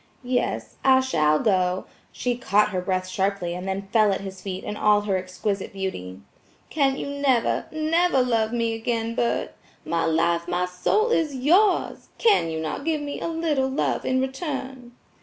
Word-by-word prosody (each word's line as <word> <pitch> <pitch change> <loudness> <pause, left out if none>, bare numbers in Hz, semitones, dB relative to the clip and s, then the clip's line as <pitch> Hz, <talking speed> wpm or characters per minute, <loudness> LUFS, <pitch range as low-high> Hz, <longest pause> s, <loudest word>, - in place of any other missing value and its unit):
"Yes, 250 0 -2
I 265 -1 +6
shall 155 -13 +2
go–" 185 -1 +1 0.3
She 245 -1 -2
caught 210 -3 +2
her 185 -3 -2
breath 185 0 -1
sharply 190 -2 -1
and 180 +2 -6
then 195 +1 -3
fell 215 -3 +5
at 195 - -2
his 190 -1 -8
feet 185 -1 -5
in 210 - -4
all 210 0 +3
her 205 -2 -1
exquisite 185 +2 -3
beauty. 100 - -5 0.5
"Can 275 -3 +2
you - - -4
never, 280 -4 +1
NEVER 315 -2 +2
love 225 -3 +1
me 230 -1 0
again, 225 0 -2
Bert? 235 0 -1 0.3
My 165 0 0
life, 170 +1 +1
my 180 +1 0
soul 420 - +1
is 315 -9 +1
yours! 355 +11 +2
Can 415 - +3
you 160 0 -3
not 160 - -4
give 310 -1 0
me 290 -1 -5
a - - -2
little 320 -5 0
love 265 - -1
in 260 0 +1
return?" 265 -3 -4
225 Hz, 175 wpm, -24 LUFS, 185-265 Hz, 0.5 s, I